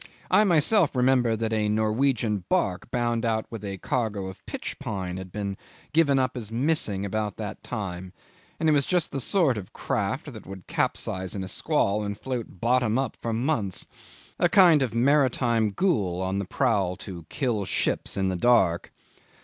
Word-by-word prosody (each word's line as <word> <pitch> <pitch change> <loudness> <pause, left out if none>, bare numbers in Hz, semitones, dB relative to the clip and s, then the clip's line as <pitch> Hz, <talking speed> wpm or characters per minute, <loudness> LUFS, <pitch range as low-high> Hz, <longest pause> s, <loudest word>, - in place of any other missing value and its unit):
I 195 +3 +6
myself 175 -1 +4
remember 125 -2 +3
that 110 0 -2
a 105 -1 +1
Norwegian 110 -1 +1
barque 90 +4 0
bound 120 -1 0
out 110 -1 0
with 115 -3 -7
a 100 -1 -4
cargo 105 -2 -2
of 95 -1 -9
pitch - - -5
pine 95 -3 -4
had 95 -1 -8
been 100 -1 -4 0.4
given 150 -4 +4
up 130 0 0
as 110 -3 -5
missing 115 -6 0
about 105 0 -2
that - - -6
time, 95 -3 -5 0.5
and 160 - +1
it - - +5
was 140 -2 +2
just 180 -3 +1
the 140 - -2
sort 140 - +2
of 95 - -11
craft - - -2
that - - -11
would 95 -2 -9
capsize 95 0 -2
in 95 - -3
a - - -5
squall 100 +2 0
and 100 0 -4
float 120 -7 -5
bottom 120 0 +2
up 135 -3 -1
for 115 - -2
months 115 - -1 0.5
a 175 - +4
kind 175 -6 +6
of 125 -4 -1
maritime 120 -4 +3
ghoul 100 - 0
on 95 +1 -1
the 100 - -2
prowl 90 0 +1
to 85 -4 -9
kill 120 -7 -1
ships 95 - -1
in 95 -1 +1
the 95 - -1
dark. 90 -5 +3
110 Hz, 180 wpm, -26 LUFS, 100-130 Hz, 0.5 s, I